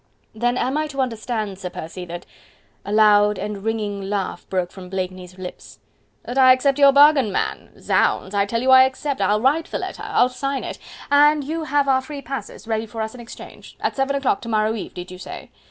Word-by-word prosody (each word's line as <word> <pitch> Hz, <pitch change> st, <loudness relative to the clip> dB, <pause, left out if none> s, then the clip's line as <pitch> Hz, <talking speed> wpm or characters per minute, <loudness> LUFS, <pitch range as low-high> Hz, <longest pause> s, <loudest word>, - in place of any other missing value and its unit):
"Then 240 Hz, +3 st, 0 dB
am 265 Hz, +4 st, 0 dB
I 310 Hz, -, -1 dB
to 275 Hz, -2 st, -8 dB
understand, 225 Hz, -5 st, -2 dB
Sir 185 Hz, -2 st, -5 dB
Percy, 180 Hz, +1 st, -7 dB
that..." 175 Hz, 0 st, -8 dB, 0.6 s
A 205 Hz, -, -6 dB
loud 210 Hz, -1 st, +5 dB
and 205 Hz, 0 st, -5 dB
ringing 210 Hz, -2 st, -2 dB
laugh 200 Hz, -2 st, -3 dB
broke 185 Hz, -2 st, -1 dB
from 185 Hz, -2 st, -11 dB
Blakeney's 185 Hz, -1 st, -5 dB
lips. 185 Hz, -1 st, -9 dB, 0.5 s
"That 250 Hz, +2 st, -3 dB
I 255 Hz, -1 st, +8 dB
accept 275 Hz, +2 st, +1 dB
your 280 Hz, -1 st, +8 dB
bargain, 280 Hz, -5 st, +5 dB
man!... -, -, -3 dB
Zounds! 190 Hz, -, +1 dB
I 200 Hz, 0 st, +1 dB
tell 230 Hz, +3 st, -1 dB
you 260 Hz, -, +3 dB
I 260 Hz, 0 st, +9 dB
accept... 265 Hz, -1 st, -3 dB
I'll 205 Hz, +2 st, +2 dB
write 295 Hz, +6 st, +2 dB
the -, -, -2 dB
letter, -, -, -6 dB
I'll -, -, +3 dB
sign 275 Hz, +2 st, -3 dB
it... -, -, -6 dB, 0.3 s
an 295 Hz, +1 st, +5 dB
you 320 Hz, +3 st, -4 dB
have 285 Hz, 0 st, +1 dB
our 260 Hz, -1 st, +3 dB
free 280 Hz, +1 st, -8 dB
passes 265 Hz, -3 st, -7 dB
ready 220 Hz, 0 st, -1 dB
for 225 Hz, +1 st, -8 dB
us 220 Hz, -, -5 dB
in 250 Hz, -, -10 dB
exchange.... 235 Hz, -, -12 dB
At -, -, -2 dB
seven 275 Hz, +1 st, 0 dB
o'clock 275 Hz, -1 st, 0 dB
to 230 Hz, -, -7 dB
morrow 215 Hz, 0 st, +1 dB
eve, 220 Hz, -, -7 dB
did 180 Hz, 0 st, -8 dB
you 185 Hz, -, -10 dB
say?... -, -, -9 dB
230 Hz, 215 wpm, -21 LUFS, 200-270 Hz, 0.6 s, I